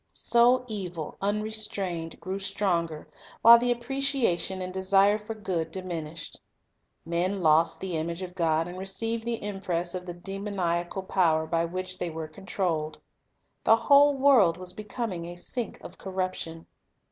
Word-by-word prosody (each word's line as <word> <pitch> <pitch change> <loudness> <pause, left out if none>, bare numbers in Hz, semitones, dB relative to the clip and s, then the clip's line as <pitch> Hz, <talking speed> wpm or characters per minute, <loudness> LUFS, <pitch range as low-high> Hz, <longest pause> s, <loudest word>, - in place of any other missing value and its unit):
So 245 +2 +3
evil, 180 -8 -5
unrestrained, 200 -5 -2
grew 190 +2 -4
stronger, 180 -5 -1 0.4
while 235 +1 +10
the 245 +1 0
appreciation 240 -7 0
and 185 0 -5
desire 195 +2 +3
for 220 +1 -6
good 180 -6 -2
diminished. 170 -4 -5 0.6
Men 180 +3 -1
lost 160 +1 +4
the 185 -3 -3
image 170 +3 -3
of 180 -1 -7
God, 165 -2 +1
and 180 +1 -7
received 225 +4 -2
the 235 -2 -3
impress 185 -4 -2
of 180 0 -5
the 175 - -5
demoniacal 190 -1 -3
power 165 -4 +2
by 165 +1 0
which 185 +2 -4
they 175 - -2
were 160 -1 -5
controlled. 160 -2 -2 0.7
The 225 - +6
whole 280 +4 +5
world 260 -11 +5
was 180 0 -2
becoming 210 -5 -4
a 175 - -7
sink 225 +5 -4
of 180 - -11
corruption. 185 -3 -4
185 Hz, 145 wpm, -27 LUFS, 170-210 Hz, 0.7 s, while